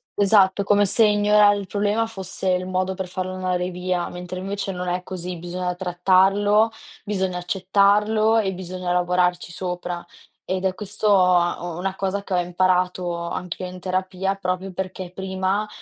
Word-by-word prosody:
esatto. 200 Hz, -1 st, +4 dB
Come 205 Hz, 0 st, +3 dB
se 220 Hz, +3 st, +4 dB
ignorare 210 Hz, 0 st, +4 dB
il 200 Hz, -2 st, -6 dB
problema 205 Hz, +3 st, 0 dB
fosse 190 Hz, -3 st, -3 dB
il 180 Hz, 0 st, 0 dB
modo 185 Hz, 0 st, -1 dB
per 190 Hz, 0 st, -4 dB
farlo 185 Hz, +1 st, -4 dB
andare 180 Hz, -1 st, -1 dB
via, 180 Hz, 0 st, -2 dB
mentre 180 Hz, +1 st, -7 dB
invece 195 Hz, +1 st, -3 dB
non 180 Hz, -1 st, -5 dB
è 180 Hz, +1 st, -1 dB
così. 180 Hz, -1 st, -5 dB
Bisogna 180 Hz, +1 st, -4 dB
trattarlo, 195 Hz, +4 st, +3 dB, 0.3 s
bisogna 190 Hz, -3 st, -1 dB
accettarlo 205 Hz, +4 st, +2 dB
e 195 Hz, -3 st, +1 dB
bisogna 185 Hz, 0 st, -5 dB
lavorarci 180 Hz, 0 st, +1 dB
sopra. 180 Hz, 0 st, -4 dB, 0.4 s
Ed 185 Hz, 0 st, -2 dB
è 185 Hz, -, +1 dB
questo, 210 Hz, +1 st, -2 dB
uhm, 175 Hz, -2 st, +2 dB
una 190 Hz, +1 st, -3 dB
cosa 195 Hz, +1 st, -2 dB
che 195 Hz, -, -5 dB
ho 180 Hz, -, +3 dB
imparato 180 Hz, 0 st, 0 dB
anch'io 180 Hz, +1 st, -5 dB
in 180 Hz, 0 st, -9 dB
terapia. 185 Hz, +1 st, -2 dB
Proprio 185 Hz, 0 st, -3 dB
perché 185 Hz, -1 st, -5 dB
prima 190 Hz, +2 st, -1 dB
185 Hz, 155 wpm, -23 LUFS, 180-200 Hz, 0.4 s, esatto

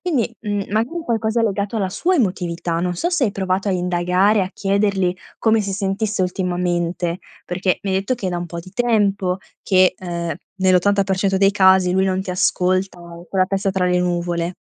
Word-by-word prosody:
quindi, 260 Hz, -10 st, -1 dB
mhmm, 205 Hz, -3 st, -2 dB
magari 235 Hz, +11 st, 0 dB
qualcosa 225 Hz, 0 st, 0 dB
legato 205 Hz, 0 st, -1 dB
alla 190 Hz, -3 st, -1 dB
sua 365 Hz, -, 0 dB
emotività. 175 Hz, -, -1 dB
Non 180 Hz, 0 st, -1 dB
so 345 Hz, -, -1 dB
se 335 Hz, -7 st, +2 dB
hai 210 Hz, -, +1 dB
provato 190 Hz, +1 st, -1 dB
a -, -, +1 dB
indagare, 180 Hz, +3 st, +2 dB
a 185 Hz, -, -2 dB
chiederli 195 Hz, -2 st, +1 dB, 0.2 s
come 220 Hz, -1 st, +3 dB
si 200 Hz, -1 st, -3 dB
sentisse 200 Hz, +1 st, -1 dB
ultimamente, 175 Hz, -1 st, -1 dB, 0.3 s
perché 185 Hz, +1 st, 0 dB
mi 195 Hz, -, -2 dB
hai 190 Hz, -, +2 dB
detto 205 Hz, +6 st, -1 dB
che 210 Hz, -6 st, -5 dB
è -, -, -2 dB
da 175 Hz, -, -2 dB
un 175 Hz, -, -4 dB
po' 170 Hz, +1 st, -7 dB
di 185 Hz, -, -13 dB
tempo 200 Hz, -5 st, +1 dB, 0.3 s
che, 185 Hz, -2 st, +4 dB
ehm, 170 Hz, -3 st, -4 dB, 0.3 s
nell'80% 190 Hz, +1 st, +2 dB
dei 195 Hz, 0 st, +5 dB
casi 190 Hz, -2 st, +4 dB
lui 190 Hz, +1 st, +2 dB
non 185 Hz, 0 st, 0 dB
ti 190 Hz, -, -5 dB
ascolta, 185 Hz, 0 st, 0 dB
o 170 Hz, 0 st, -11 dB
è -, -, -28 dB
con 190 Hz, +1 st, -1 dB
la -, -, +6 dB
testa 195 Hz, 0 st, -1 dB
tra 190 Hz, -1 st, 0 dB
le 180 Hz, 0 st, +2 dB
nuvole. 175 Hz, 0 st, -1 dB
190 Hz, 200 wpm, -20 LUFS, 180-205 Hz, 0.3 s, la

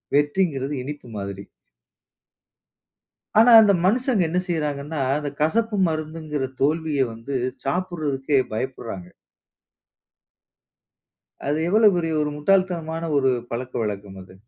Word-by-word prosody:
வெற்றிங்கிறது 145 Hz, -2 st, +1 dB
இனிப்பு 145 Hz, -1 st, -7 dB
மாதிரி. 100 Hz, 0 st, -5 dB, 2.0 s
ஆனா, 240 Hz, +2 st, +7 dB
அந்த 205 Hz, -2 st, +5 dB
மனுஷங்க 240 Hz, +1 st, +2 dB
என்ன 180 Hz, +2 st, +1 dB
செய்றாங்கன்னா, 150 Hz, -3 st, -2 dB, 0.2 s
அந்த 150 Hz, -1 st, -3 dB
கசப்பு 215 Hz, +7 st, +1 dB
மருந்துங்கிற 155 Hz, -2 st, -4 dB, 0.2 s
தோல்விய 150 Hz, 0 st, +1 dB
வந்து 115 Hz, +5 st, -7 dB, 0.3 s
சாப்பிடுறதுக்கே 150 Hz, -4 st, -1 dB, 0.2 s
பயப்புட்றாங்க. 110 Hz, -6 st, -5 dB, 2.4 s
அது 145 Hz, +2 st, +1 dB
எவ்வளவு 210 Hz, +1 st, +5 dB
பெரிய 165 Hz, -2 st, -1 dB
ஒரு 150 Hz, -, 0 dB
முட்டாள் 190 Hz, +5 st, +3 dB
தனமான 165 Hz, -1 st, -4 dB
ஒரு 135 Hz, -1 st, +3 dB, 0.2 s
பழக்க 125 Hz, +2 st, -5 dB
வழக்கம் 100 Hz, -2 st, -5 dB
அது. 95 Hz, -, -16 dB
150 Hz, 105 wpm, -23 LUFS, 135-175 Hz, 2.4 s, ஆனா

